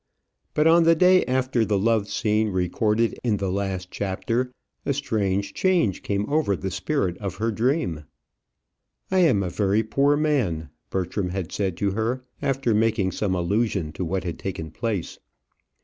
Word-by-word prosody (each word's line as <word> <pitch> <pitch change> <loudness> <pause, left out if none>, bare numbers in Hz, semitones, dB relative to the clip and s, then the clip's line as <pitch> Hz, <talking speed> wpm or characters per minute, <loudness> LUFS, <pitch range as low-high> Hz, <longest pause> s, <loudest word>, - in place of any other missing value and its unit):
But 150 - +3
on 165 +1 +6
the 165 0 +5
day 185 +2 +5
after 130 -1 +1
the 105 -2 +1
love 110 0 +2
scene 110 0 +1
recorded 105 +5 0
in 110 -4 +1
the 95 -1 -2
last 95 -2 -3
chapter, 115 +6 -2 0.3
a 140 - 0
strange 100 -7 -1
change 175 - +1
came 100 0 -1
over 150 -9 +1
the 95 +1 -4
spirit 95 - -1
of 95 -3 -4
her 115 +3 -1
dream. 110 - 0 1.1
"I 190 - +3
am 130 - +4
a 90 - -2
very 105 +3 +1
poor 140 +6 +2
man," 115 - 0 0.2
Bertram 95 0 -2
had 90 -2 -4
said 95 -4 -2
to 100 -1 0
her, 115 +5 -1 0.2
after 135 -4 +1
making 105 -3 +2
some 95 0 -1
allusion 95 -2 0
to 90 - -4
what 95 +2 -2
had 85 -3 -5
taken 85 -5 -5
place. 110 -3 -3
105 Hz, 165 wpm, -24 LUFS, 95-125 Hz, 1.1 s, on